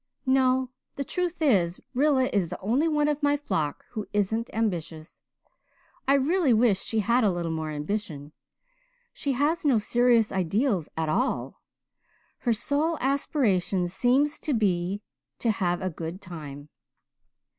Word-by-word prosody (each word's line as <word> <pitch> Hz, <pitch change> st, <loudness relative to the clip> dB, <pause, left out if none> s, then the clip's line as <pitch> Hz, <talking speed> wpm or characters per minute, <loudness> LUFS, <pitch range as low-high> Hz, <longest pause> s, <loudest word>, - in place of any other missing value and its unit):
"No. 260 Hz, -1 st, +2 dB, 0.2 s
The 280 Hz, -, -2 dB
truth 350 Hz, +2 st, -2 dB
is, 185 Hz, -, +2 dB
Rilla 270 Hz, 0 st, +3 dB
is 190 Hz, -5 st, +1 dB
the -, -, -6 dB
only 250 Hz, -, +1 dB
one 300 Hz, -2 st, +2 dB
of 300 Hz, 0 st, -1 dB
my 290 Hz, 0 st, +3 dB
flock 160 Hz, -, -2 dB
who 215 Hz, -3 st, -5 dB
isn't 220 Hz, +3 st, 0 dB
ambitious. 170 Hz, -8 st, -3 dB, 0.9 s
I 275 Hz, -, +5 dB
really 290 Hz, 0 st, +3 dB
wish 220 Hz, -4 st, +3 dB
she 220 Hz, -1 st, -1 dB
had 235 Hz, +4 st, +2 dB
a 210 Hz, -, +4 dB
little 175 Hz, -2 st, -2 dB
more 160 Hz, -1 st, -3 dB
ambition. 150 Hz, -1 st, -4 dB, 0.8 s
She 280 Hz, -, -2 dB
has 295 Hz, +6 st, +1 dB
no 275 Hz, -6 st, +4 dB
serious 235 Hz, +1 st, +3 dB
ideals 190 Hz, -, 0 dB
at 160 Hz, -1 st, 0 dB
all 240 Hz, -, -1 dB, 0.8 s
her 240 Hz, -, 0 dB
sole 295 Hz, +8 st, 0 dB
aspiration 215 Hz, -, +1 dB
seems 255 Hz, -, +1 dB
to 295 Hz, -, -1 dB
be 195 Hz, -1 st, 0 dB, 0.3 s
to 230 Hz, -, +1 dB
have 180 Hz, -3 st, -1 dB
a 185 Hz, -, -1 dB
good 165 Hz, +3 st, -6 dB
time." 150 Hz, -6 st, -9 dB
225 Hz, 145 wpm, -26 LUFS, 175-275 Hz, 0.9 s, I